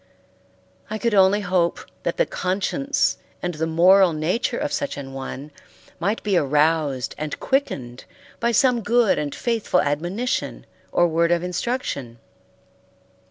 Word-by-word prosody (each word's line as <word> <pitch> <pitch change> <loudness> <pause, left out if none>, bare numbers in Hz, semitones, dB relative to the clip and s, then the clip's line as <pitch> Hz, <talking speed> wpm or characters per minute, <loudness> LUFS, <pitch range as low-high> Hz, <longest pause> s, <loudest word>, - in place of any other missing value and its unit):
I 215 - -3
could 235 0 0
only 195 +1 +5
hope 180 -3 +1 0.2
that - - -2
the - - +3
conscience 205 +10 -1 0.3
and 180 0 -1
the 160 +1 -2
moral 180 +2 +5
nature 185 +11 -1
of 295 -1 -2
such 285 - -2
an 135 -1 -7
one 135 +2 -7 0.5
might 200 +6 -1
be 205 -3 +1
aroused 150 -3 +1
and 150 -1 -4
quickened 130 - -2 0.3
by 235 0 +1
some 240 +1 +3
good 230 0 +3
and 145 -1 -3
faithful 225 -6 0
admonition 175 - -2 0.3
or 175 - +3
word 170 +1 +1
of 175 0 +2
instruction. 180 - -3
180 Hz, 135 wpm, -23 LUFS, 155-230 Hz, 0.5 s, only